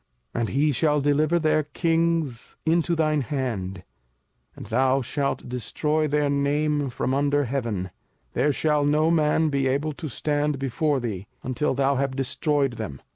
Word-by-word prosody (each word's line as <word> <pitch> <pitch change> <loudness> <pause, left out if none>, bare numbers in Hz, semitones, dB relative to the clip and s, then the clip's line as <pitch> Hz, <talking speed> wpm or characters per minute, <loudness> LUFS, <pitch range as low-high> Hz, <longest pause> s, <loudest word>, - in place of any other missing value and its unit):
05:007:024 - - 0
And 115 - -1
he 145 +3 +2
shall 150 +2 +2
deliver 145 +4 +2
their 155 -1 +2
kings 165 -4 -1
into 170 +1 +2
thine 155 -2 +2
hand, 110 -8 -3 0.7
and - - -9
thou 130 0 +2
shalt 140 +2 -2
destroy 150 +6 -1
their 150 0 +1
name 145 0 +1
from 130 +1 -2
under 145 +1 +2
heaven: 115 -8 -2 0.4
there 140 +5 +2
shall 150 +2 +1
no 150 +3 +3
man 155 -1 +3
be 140 -2 +1
able 145 +4 0
to 155 +1 -6
stand 145 +3 -1
before 135 +2 0
thee, 105 -5 -4 0.2
until 130 +3 -1
thou 135 0 +2
have 135 0 -1
destroyed 135 -1 0
them. 95 -12 -5
145 Hz, 155 wpm, -25 LUFS, 130-150 Hz, 0.7 s, no